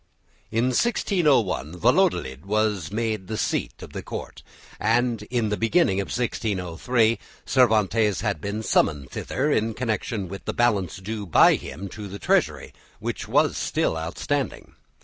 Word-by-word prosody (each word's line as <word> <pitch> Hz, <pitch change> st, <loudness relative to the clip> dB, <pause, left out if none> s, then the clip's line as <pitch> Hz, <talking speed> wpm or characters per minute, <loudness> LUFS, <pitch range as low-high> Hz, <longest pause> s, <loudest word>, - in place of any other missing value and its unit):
In 115 Hz, +3 st, +1 dB
1601 135 Hz, -, +1 dB
Valladolid 65 Hz, -2 st, +1 dB
was 105 Hz, -5 st, 0 dB
made 110 Hz, -3 st, -2 dB
the 110 Hz, -, -3 dB
seat -, -, -2 dB
of -, -, -11 dB
the -, -, -4 dB
Court, -, -, -7 dB, 0.4 s
and 120 Hz, 0 st, +1 dB
at 120 Hz, -4 st, +1 dB
the -, -, +2 dB
beginning 115 Hz, -, +2 dB
of 100 Hz, -, -5 dB
1603 110 Hz, 0 st, 0 dB, 0.3 s
Cervantes 110 Hz, -4 st, +3 dB
had 100 Hz, -8 st, -1 dB
been 105 Hz, +4 st, -3 dB
summoned 70 Hz, -9 st, +1 dB
thither 150 Hz, +3 st, -1 dB
in 110 Hz, -3 st, +1 dB
connection 110 Hz, -4 st, -2 dB
with 100 Hz, +2 st, -8 dB
the -, -, -2 dB
balance 110 Hz, -6 st, +1 dB
due 105 Hz, +1 st, -5 dB
by 80 Hz, -, +6 dB
him 90 Hz, +9 st, -5 dB
to 105 Hz, +2 st, -7 dB
the 100 Hz, +1 st, -7 dB
Treasury, 95 Hz, -, 0 dB, 0.2 s
which -, -, -4 dB
was -, -, +3 dB
still -, -, 0 dB
outstanding. 90 Hz, -, -3 dB
110 Hz, 145 wpm, -24 LUFS, 95-120 Hz, 0.4 s, by